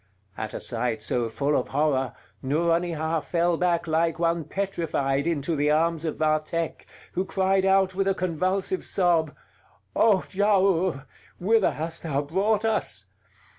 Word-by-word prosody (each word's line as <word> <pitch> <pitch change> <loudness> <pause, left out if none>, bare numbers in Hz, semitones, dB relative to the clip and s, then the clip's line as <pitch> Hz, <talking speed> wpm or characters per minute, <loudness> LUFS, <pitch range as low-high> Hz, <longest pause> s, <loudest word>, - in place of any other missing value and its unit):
At 110 0 -5
a - - -3
sight 115 -2 -2
so 115 +2 -1
full 140 +6 0
of 125 - 0
horror, 135 -3 0 0.3
Nouronihar 165 +2 0
fell 170 +1 +1
back 170 0 +1
like 165 0 +1
one 170 -1 0
petrified 155 -6 -1
into 165 0 -1
the 145 0 +1
arms 165 +1 +1
of 155 - -3
Vathek, 155 +1 -1 0.2
who 185 - -1
cried 190 0 +1
out 190 -1 +3
with 195 +1 0
a 195 - +2
convulsive 185 +2 -1
sob: 170 -5 +1 0.6
"O 210 -5 +4
Giaour! 190 -6 +2 0.3
whither 215 +2 +2
hast 165 +2 -3
thou 145 -3 -1
brought 200 +8 +1
us? 100 - -2
165 Hz, 140 wpm, -25 LUFS, 150-185 Hz, 0.6 s, O